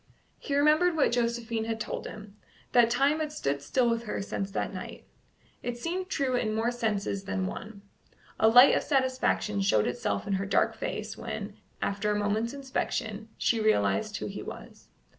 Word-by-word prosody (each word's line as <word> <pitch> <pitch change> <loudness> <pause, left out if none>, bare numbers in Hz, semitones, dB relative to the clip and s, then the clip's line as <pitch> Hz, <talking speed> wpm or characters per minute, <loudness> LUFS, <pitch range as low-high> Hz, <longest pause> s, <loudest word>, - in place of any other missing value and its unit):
He 280 - -3
remembered 310 +4 +4
what 300 - +3
Josephine 235 -1 -1
had 225 0 -3
told 215 - -4
him 210 -1 -10 0.4
that 240 -2 +5
time 275 +6 +2
had 305 -1 -2
stood 140 - -2
still 245 - +1
with 230 0 0
her 210 - -3
since 195 0 -3
that 195 - -3
night: 185 -1 -8 0.6
it 245 -1 -4
seemed 365 +8 -3
true 270 -8 0
in 215 -3 0
more 230 +2 +1
senses 210 -4 -2
than 190 -1 -1
one. 200 +1 -7 0.6
A 220 - +5
light 245 +4 +8
of - - +2
satisfaction 260 -7 +1
showed 110 - +3
itself 240 -3 -2
in 200 - -1
her 195 +1 0
dark - - +2
face - - -4
when, - - -5 0.3
after 200 +1 -1
a 210 - +1
moment's 215 +5 0
inspection, 230 -5 -3
she 230 - +1
realized 100 - +2
who - - -5
he - - -5
was. - - -10
230 Hz, 180 wpm, -29 LUFS, 205-260 Hz, 0.6 s, light